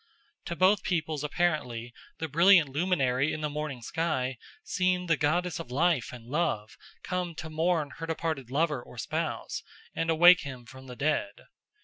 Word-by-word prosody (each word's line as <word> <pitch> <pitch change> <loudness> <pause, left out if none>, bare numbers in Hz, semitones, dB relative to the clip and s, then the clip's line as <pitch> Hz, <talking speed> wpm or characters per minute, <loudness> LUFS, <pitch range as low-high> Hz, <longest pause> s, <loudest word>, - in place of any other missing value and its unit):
To 170 - -4
both 185 +3 +4
peoples 155 -5 -1
apparently 145 -8 -1 0.2
the 160 - -3
brilliant 165 +1 +5
luminary 140 -3 +1
in 155 - -4
the 150 -1 -2
morning 150 -5 -4
sky 130 -3 -1 0.3
seemed 180 -1 0
the 165 - +4
goddess 170 +4 0
of 165 - -7
life 150 0 +1
and 120 -2 -10
love 130 -6 -1 0.3
come 180 -2 -3
to 160 0 -7
mourn 160 -2 0
her 165 - -5
departed 160 -6 -3
lover 150 -1 0
or 125 - -14
spouse 110 - -3 0.3
and 165 - -2
to 165 - +2
wake 175 +2 +8
him 130 -4 -8
from 130 +3 -13
the 125 - -8
dead. 155 +9 -1
155 Hz, 165 wpm, -29 LUFS, 130-170 Hz, 0.3 s, wake